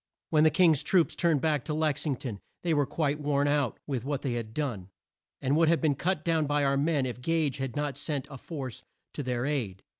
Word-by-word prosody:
When 155 -1 +5
the 155 - +7
King's 160 -3 +4
troops 170 +2 +2
turned 165 -6 +2
back 150 -4 +1
to 150 - -2
Lex 155 -1 0
ing 140 - +1
ton, 120 -6 -6 0.2
they 170 -2 +1
were 145 -3 +2
quite 150 -1 -1
worn 145 -1 +1
out 145 -5 +1
with 130 -5 -3
what 140 0 -2
they 130 -4 -1
had 115 -2 -4
done, 110 -9 -3 0.5
and 135 +2 +2
would 165 +1 +4
have 165 +1 +4
been 155 -3 +2
cut 165 +3 -1
down 160 -3 +2
by 145 0 +1
our 140 0 +2
men 145 -1 +1
if 125 -1 -5
Gage 160 -2 0
had 135 -3 -3
not 145 -2 -2
sent 145 -3 -2
a 135 - -8
force 135 -8 -6 0.3
to - - -4
their 125 -2 -1
aid. 120 -11 -2
145 Hz, 235 wpm, -29 LUFS, 130-155 Hz, 0.5 s, the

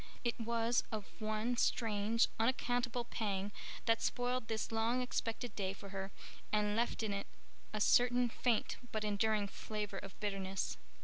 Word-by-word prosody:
It 235 -1 0
was 235 +1 +2
of 215 -3 -3
one 215 +2 0
strange, 225 0 +3
unaccountable 245 0 +1
pang 205 -4 -1 0.3
that 230 0 +4
spoiled 245 -1 0
this 220 -1 -1
long 225 +2 +2
expected 245 0 -2
day 190 -2 -1
for 200 0 -9
her 195 0 -4 0.4
and 210 -1 +2
left 230 0 +1
in 210 -2 0
it 200 0 -3 0.4
a 215 - -2
certain 245 +3 +5
faint 235 -1 +1
but 215 -1 -1
enduring 210 0 +2
flavor 210 +1 -4
of 195 - -10
bitterness. 195 -2 -1
220 Hz, 145 wpm, -37 LUFS, 205-235 Hz, 0.4 s, certain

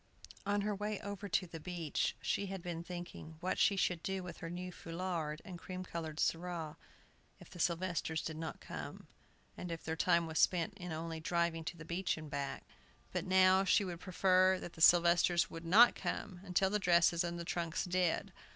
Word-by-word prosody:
On 205 0 +2
her 210 +1 0
way 205 +1 -3
over 200 0 -6
to 185 - +1
the 165 -2 -8
beach 170 -2 -2
she 200 - 0
had 190 -2 -6
been 170 -1 -4
thinking 175 -2 -8
what 180 +2 -1
she 200 - +4
should 180 -3 +1
do 190 0 -3
with 180 - -8
her 165 - -6
new 180 +1 -5
foulard 165 -3 -4
and 180 -3 -8
cream 185 +1 -6
colored 160 -3 -5
surah 165 -2 -1 0.7
if - - -15
the 175 - -11
Sylvesters 170 -2 0
did 160 - -4
not 160 0 -5
come, - - -7 0.5
and 180 - -6
if 165 - -5
their 160 - -2
time 170 0 +3
was 160 0 -2
spent 175 -3 +3
in 180 -3 -7
only 160 0 -4
driving 170 0 0
to 170 - -5
the 165 - -9
beach 175 +2 -1
and 155 -2 -8
back. 140 -1 -3 0.5
But - - -3
now, 185 0 +5
she 195 +1 +3
would 175 -2 -5
prefer 185 0 +3
that 175 - -8
the 160 - -10
Sylvesters 175 0 +5
would 165 0 -7
not 220 +8 +7
come 190 -4 -4 0.2
till 190 +1 +4
the 210 - +1
dresses 170 -2 +4
and 175 0 -3
the 170 - -5
trunks 170 0 -2
did. 180 -2 0
175 Hz, 195 wpm, -35 LUFS, 165-185 Hz, 0.7 s, not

